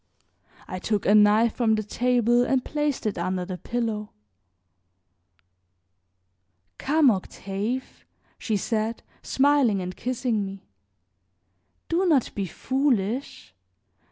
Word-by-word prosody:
I 185 - -5
took 210 +1 -1
a 205 - +4
knife 215 +2 +5
from 225 -3 +2
the 215 - -2
table 240 +2 +2
and 260 0 0
placed 295 -4 -2
it 210 -5 -1
under 180 +1 -2
the 180 -1 -6
pillow. 225 -3 -3 2.7
"Come, 295 -2 +4
Octave," 200 +5 -4 0.4
she 215 -3 -1
said, 220 +2 -2 0.2
smiling 270 -7 +2
and 180 0 -5
kissing 245 -3 -1
me, 195 0 -8 1.2
"do 360 +3 +1
not 290 -8 +2
be 195 -2 -3
foolish. 255 - -1
225 Hz, 105 wpm, -25 LUFS, 200-255 Hz, 2.7 s, knife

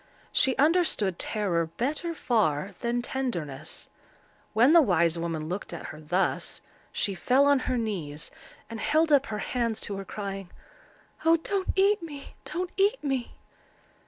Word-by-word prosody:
She 265 -2 +4
understood 290 - +2
terror 180 -6 0
better 295 - -2
far 200 - +1
than 240 0 -1
tenderness. 175 - -4 0.7
When 245 +8 +6
the 340 - +9
wise 170 - +3
woman 165 -2 -3
looked 185 +1 -4
at 170 - -6
her 155 - -11
thus, 175 +5 0 0.3
she 200 - -1
fell 255 +9 +3
on 285 -1 +5
her 255 - +1
knees, 170 -10 -4 0.4
and 225 0 -7
held 315 +6 +2
up 280 -1 +5
her 215 - -3
hands 230 0 -1
to 200 - -4
her, 195 - -4
crying,— 195 -2 -5 0.7
"Oh, 325 +1 +5
don't 380 +3 -2
eat 400 +2 +4
me! 290 -4 -8
don't 360 +1 -3
eat 405 +3 +2
me!" 270 -4 -2
235 Hz, 150 wpm, -28 LUFS, 185-295 Hz, 0.7 s, the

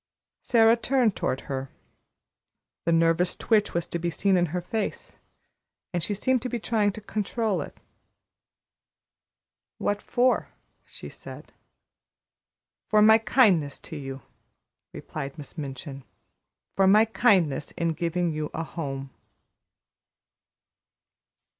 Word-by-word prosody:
Sara 225 -1 +5
turned 240 -3 +1
toward 130 - -2
her. 135 -1 -5 1.2
The 170 - +2
nervous 165 +1 +3
twitch 210 -5 +1
was 170 -1 -1
to 170 - -3
be 170 +1 -1
seen 195 +4 0
again 180 -2 +4
in - - -11
her 180 +1 -2
face, 210 +4 -4 0.8
and 175 - 0
she 205 +5 -1
seemed 255 +4 +1
to 250 - -4
be 240 - -3
trying 210 -2 +1
to 215 - -9
control 215 0 -2
it. - - -9 2.0
"What 205 0 -1
for?" 250 +1 +1 0.4
she - - -10
said. - - -11 1.3
"For 210 0 +4
my 220 +1 +7
kindness 195 - +3
to - - -9
you," 135 -2 -7 0.7
replied 140 -1 -7
Miss 145 -3 -10
Minchin. 135 -2 -7 0.7
"For 195 -1 +4
my 210 +3 +6
kindness 185 - +2
in 170 -1 0
giving 170 +2 -1
you 155 -1 -3
a 165 - -2
home." 135 -5 -6
180 Hz, 120 wpm, -26 LUFS, 155-215 Hz, 2.0 s, my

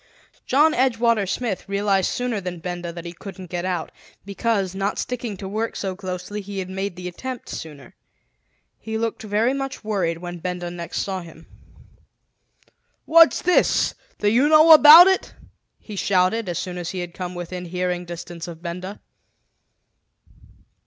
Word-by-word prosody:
John 300 +4 +4
Edgewater 230 -5 +1
Smith 205 -6 -3
realized 200 -1 +1
sooner 245 -4 -2
than 180 -1 -5
Benda 175 0 -5
that 170 0 -9
he 170 - -6
couldn't 185 -1 -10
get 175 0 -3
out, 180 -3 -3 0.3
because, 200 -2 -1
not 195 +1 -2
sticking 235 -5 -4
to 190 - -7
work 220 +3 -3
so 190 -2 -3
closely, 185 +2 -6
he 200 0 -8
had 185 -1 -4
made 195 -1 -4
the 180 0 -7
attempt 250 +8 -7
sooner. 145 -5 -9 0.9
He 220 0 -4
looked 225 0 -3
very 220 +4 +1
much 270 -2 -5
worried 190 -6 -1
when 175 0 -7
Benda 175 0 -4
next 170 -1 -4
saw 190 -2 -4
him. 165 -1 -13 1.6
"What's 330 0 +6
this? 360 +1 +3 0.2
Do 205 - -1
you 245 +8 +4
know 310 +1 +7
about 310 +2 +11
it?" 380 0 0 0.4
he 210 - -10
shouted 190 +2 +1
as 175 - -3
soon 180 -1 -4
as 175 -1 -4
he 185 - -5
had 175 -1 -7
come 180 0 -6
within 180 +1 -6
hearing 180 0 -3
distance 175 0 -8
of 170 -2 -9
Benda. 180 +3 -6
190 Hz, 160 wpm, -22 LUFS, 175-225 Hz, 1.6 s, about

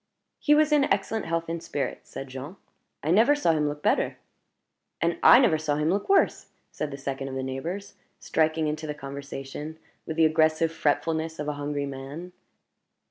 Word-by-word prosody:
"He 295 - +4
was 305 0 +3
in 295 -2 +5
excellent 210 +2 0
health 165 0 -1
and 165 0 -3
spirits," 140 -4 -4
said 135 - -7
Jean. 135 +7 -8 0.5
"I 155 - +1
never 230 +10 +5
saw 290 -12 +2
him 150 -2 +1
look 150 0 -5
better - - +1 0.4
" - - -55
"And 170 0 0
I - - +9
never 225 -12 +4
saw 155 -2 0
him 150 +2 +1
look 200 - -1
worse," 395 - +3 0.2
said 150 - -4
the 140 - -7
second 135 -1 -4
of 135 - -5
the 130 - -2
neighbors, 165 +10 -5 0.3
striking 160 0 +1
into 155 +1 -3
the 150 - -4
conversation 140 +2 -7 0.3
with 160 - -4
the 165 - +5
aggressive 155 +1 +3
fretfulness 160 +1 0
of 150 - -4
a 150 - -1
hungry 145 0 -3
man. 140 +6 -7
155 Hz, 190 wpm, -26 LUFS, 145-170 Hz, 0.5 s, I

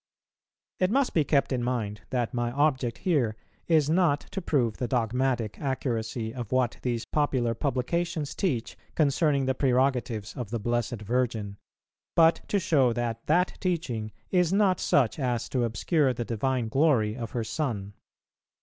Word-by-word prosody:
[436:1] 185 - +4
It 185 - -1
must 275 -1 +2
be 160 - +3
kept 140 -1 +1
in 125 -2 0
mind 110 -4 -2
that 125 -2 -1
my 120 -1 0
object 135 -4 +1
here 135 - +1 0.3
is 155 -4 +4
not 160 -3 +3
to 195 - -3
prove 125 - 0
the 125 - -2
dogmatic 120 -2 0
accuracy 115 -4 -2
of 120 -5 -6
what 130 -2 +1
these 120 -2 -2
popular 130 -6 0
publications 145 +5 -1
teach 130 - -2 0.2
concerning 145 -2 +2
the 130 - +1
prerogatives 125 -5 0
of 125 -7 -5
the 115 - -2
Blessed 120 0 -2
Virgin, 110 -3 -1 0.6
but 165 0 +5
to 205 - +1
show 150 -9 +3
that 115 -1 -3
that 180 +4 +2
teaching 150 - -2 0.2
is 180 -2 +3
not 195 -2 +3
such 130 0 +2
as 125 -3 -1
to 125 -2 +1
obscure 135 +4 +1
the 120 - -3
divine 120 +1 -1
glory 120 -5 +2
of 115 -3 -6
her 120 - -1
Son. 110 -5 -3
130 Hz, 160 wpm, -27 LUFS, 115-150 Hz, 0.6 s, but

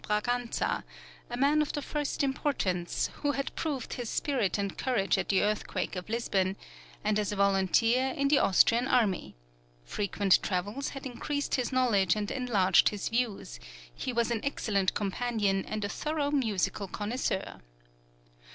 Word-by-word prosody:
Braganza, 240 +3 -1 0.5
a 240 - -4
man 285 +4 +3
of 300 - -2
the 290 - -2
first 295 0 -2
importance, 240 -11 -1
who 290 -1 +1
had 275 -1 -3
proved 290 -5 -3
his 240 -3 -4
spirit 250 -11 0
and 200 -1 -2
courage 235 -7 +1
at - - -2
the 195 - +3
earthquake 205 -3 -1
of 180 +2 -6
Lisbon, 195 -5 0 0.5
and 215 0 +1
as 210 -1 -1
a - - -2
volunteer 200 +6 +3
in 280 - +2
the 280 0 +4
Austrian 230 +6 +4
army; 215 -9 +1 0.5
frequent 200 - +2
travels 205 +9 -2
had 270 - -8
increased 285 +3 -3
his 255 -1 0
knowledge 220 -9 +3
and 210 -1 -3
enlarged 205 -8 +3
his 205 -2 -4
views; 225 - -2 0.3
he 255 - -4
was 235 0 0
an 225 -2 -1
excellent 200 -8 0
companion 205 -1 0
and 215 -1 -3
a - - -3
thorough 300 +3 -2
musical 205 -7 0
connoisseur. 205 - -3
220 Hz, 150 wpm, -29 LUFS, 195-260 Hz, 0.5 s, the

